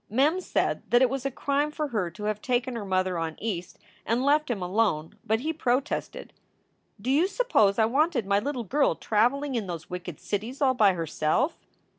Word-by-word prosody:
Mem 290 - +2
said - - 0
that 240 +2 +5
it 255 - +3
was 270 0 -2
a - - -1
crime 285 +3 0
for 300 -1 -3
her 210 -8 -1
to 195 +5 -10
have 210 0 -2
taken 250 0 -1
her 230 - -4
mother 185 -2 0
on 160 -1 -3
East 185 -5 -4 0.3
and 240 +4 0
left 300 +1 +3
him 235 -5 -1
alone, 180 -4 0
but 220 +2 0
he 315 +4 -1
protested: 280 - -2 0.7
"D 245 +6 -2
you 335 +5 +4
suppose 390 - +2
I 220 - +4
wanted 275 - +1
my 200 +1 +2
little 255 +2 -3
girl 280 +7 +2
traveling 260 +6 +1
in 225 -5 -2
those 170 -2 -7
wicked 180 -3 -6
cities 220 +6 -4
all 265 -2 +3
by 210 -6 +4
herself?" 165 - 0
235 Hz, 195 wpm, -27 LUFS, 195-280 Hz, 0.7 s, that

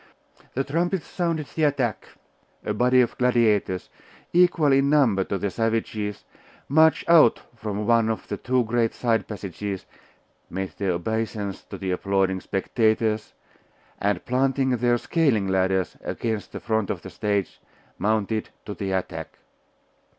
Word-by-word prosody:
The 135 - +1
trumpets 170 +5 -1
sounded 165 -4 -2
the 155 - +2
attack: 130 -7 -1 0.6
a - - 0
body 125 +1 +4
of 120 - 0
gladiators, 110 -7 +2 0.4
equal 175 -4 +4
in 135 +1 +3
number 125 -10 +4
to 100 - -2
the 100 +1 -2
savages, 110 -2 -2 0.4
marched 160 +1 +4
out 165 -8 +6 0.2
from 105 -2 -4
one 115 -1 +3
of 110 - -3
the 100 - -3
two 125 +2 +1
great 115 0 0
side 115 -2 0
passages, 100 -1 -5 0.6
made 95 0 -4
their 95 -3 +1
obeisance 105 +1 -3
to - - -8
the 95 -1 -3
applauding 95 0 0
spectators, 110 +2 0 0.6
and 100 -3 0
planting 130 +1 +1
their 120 0 +2
scaling 125 - +1
ladders 95 -1 +1
against 110 -3 -3
the - - -6
front 110 -3 -1
of 90 - -3
the - - -8
stage, 100 -3 -2 0.4
mounted 110 +1 0 0.2
to 105 - -5
the 100 -1 -4
attack. 85 -4 -4
110 Hz, 140 wpm, -24 LUFS, 100-130 Hz, 0.6 s, out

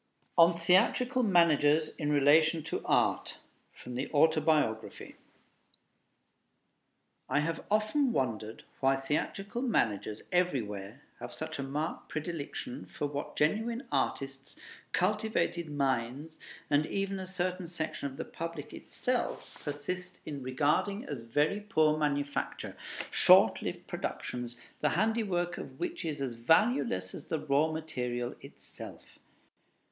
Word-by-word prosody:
ON 170 0 +7
THEATRICAL 220 +9 +3
MANAGERS 160 - +4
IN 150 -2 -3
RELATION 155 +3 +5
TO 160 - -3
ART - - +1 0.3
From 125 - -10
the 130 +3 -3
'Autobiography' 155 -7 +2 2.1
I 145 +3 +3
have 165 +2 -2
often 215 +6 +2
wondered 110 - -2 0.2
why 135 0 +4
theatrical 195 - -2
managers 110 - 0
everywhere 110 - -1 0.2
have - - -7
such - - -5
a - - 0
marked 145 +4 -3
predilection 150 -4 -5
for - - -4
what 145 0 -4
genuine 225 - 0
artists, 135 0 -2 0.3
cultivated 185 -3 0
minds, 140 +2 -1 0.3
and 145 +1 +2
even 195 0 -2
a 185 - -5
certain 180 -1 -2
section 160 -3 -3
of 135 -1 -9
the - - -4
public 165 -3 -6
itself - - -3
persist 180 +5 -4
in 145 -2 -5
regarding 150 - +1
as 140 -5 -5
very 145 - +1
poor 160 -8 +3
manufacture, 145 -2 -2 0.4
short - - +6
lived - - -4
productions, 120 -1 -4 0.2
the 150 - +2
handiwork 190 -3 0
of - - -9
which 350 -1 -3
is 145 -3 -2
as 130 -3 -2
valueless 115 - +2
as - - -9
the 160 - 0
raw 150 +2 +2
material 125 -6 -3
itself. - - -12
155 Hz, 120 wpm, -31 LUFS, 135-180 Hz, 2.1 s, ON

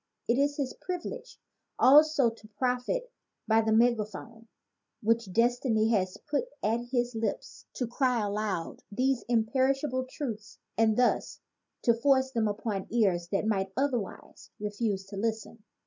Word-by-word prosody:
It 235 +3 +2
is 285 +1 +1
his 270 -3 -2
privilege 415 +7 -6 0.4
also 290 -2 +6
to 225 -1 -15
profit 250 - -2 0.4
by 225 0 +4
the 220 0 0
megaphone 225 0 0 0.6
which 225 -2 +1
destiny 230 0 +2
has 190 -5 0
put 290 +11 -2 0.2
at 230 +3 0
his 245 -1 0
lips 225 -2 -4
to 250 - -2
cry 245 -1 +1
aloud 200 -4 -3
these 255 +3 +1
imperishable 260 +3 +1
truths 220 -8 -6 0.2
and 220 -1 +3
thus 250 0 +1 0.4
to 235 - +5
force 265 +2 +2
them 230 -3 +1
upon 205 -1 -3
ears 190 -7 +2
that 195 +3 -1
might 195 -3 0
otherwise 255 -7 -3
re 210 0 -3
fuse 205 -3 -2
to 195 0 -9
listen. 220 +1 -3
230 Hz, 140 wpm, -29 LUFS, 215-260 Hz, 0.6 s, also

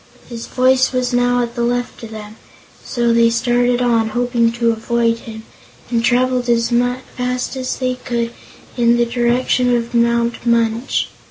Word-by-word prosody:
His 230 -1 -7
voice 260 +1 +2
was 250 -1 -1
now 245 0 +2
at 235 0 -5
the 240 - -3
left 245 +1 -2
of 230 - -8
them, 215 0 -9 0.5
so 235 -2 0
they 230 0 +4
started 245 +1 +1
on, 230 -2 +2
hoping 240 -1 +1
to 235 -1 +1
avoid 230 +1 0
him, 220 -1 -10 0.5
and 230 -1 +1
traveled 250 0 +1
as 230 0 +2 0.4
fast 250 +1 -2
as 255 -1 -3
they 255 -1 -1
could 235 -1 -2 0.4
in 235 -1 +3
the 240 - +2
direction 245 +1 +1
of 235 +1 -5
Mount 235 0 +1
Munch. 235 +1 +1
240 Hz, 160 wpm, -18 LUFS, 230-245 Hz, 0.5 s, they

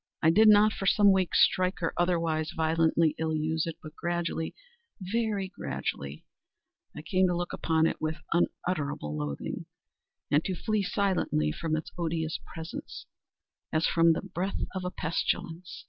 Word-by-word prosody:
I 160 - +6
did 215 +5 +6
not, 210 0 +7
for 195 - -3
some 205 0 +6
weeks, 190 -3 +5
strike, 185 0 -1
or 165 - 0
otherwise 165 -3 +1
violently 160 0 +3
ill 160 -1 0
use 160 +1 0
it; 165 -1 -5
but 155 0 -10
gradually—very 200 - -3
gradually—I 70 - -7
came 185 +3 +2
to 175 -1 0
look 175 0 -3
upon 160 -1 +2
it - - -1
with 155 0 -1 0.2
unutterable 150 - -1
loathing, 75 -2 -4 0.6
and 150 +2 +4
to 190 - -1
flee 215 +3 0
silently 190 - 0
from 155 - -2
its 155 - -4
odious 160 -1 -1
presence, 165 0 -8 0.7
as 155 +1 +2
from 165 0 +4
the - - -3
breath 190 +3 -3 0.2
of 185 -1 -3
a 180 - -1
pestilence. 165 0 -3
170 Hz, 145 wpm, -29 LUFS, 160-185 Hz, 0.7 s, not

